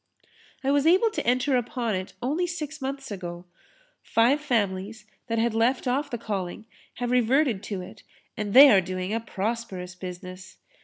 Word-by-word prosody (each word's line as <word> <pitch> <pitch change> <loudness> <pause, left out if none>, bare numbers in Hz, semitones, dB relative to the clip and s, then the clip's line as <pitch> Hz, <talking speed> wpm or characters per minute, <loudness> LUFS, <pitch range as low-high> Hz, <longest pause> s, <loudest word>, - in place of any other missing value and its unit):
I 270 - +2
was 285 +2 +3
able 385 +7 +4
to 430 - -4
enter 255 +3 +2
upon 245 -2 -1
it 185 0 -4
only 310 +8 0
six 315 -4 -5
months 270 -1 -5
ago. 175 -2 -6 0.6
Five 245 +6 +2
families 210 -5 -1 0.2
that 230 - -1
had 230 0 +1
left 240 +4 +1
off 270 +4 0
the 240 - -3
calling 205 -2 -4 0.3
have 245 0 -3
reverted 250 -2 +2
to 195 -3 -4
it 200 +3 -12 0.3
and 210 0 -3
they 275 +1 +11
are 195 -3 +6
doing 185 +2 -4
a 225 - 0
prosperous 210 -4 -4
business. 185 0 -9
230 Hz, 165 wpm, -26 LUFS, 190-270 Hz, 0.6 s, they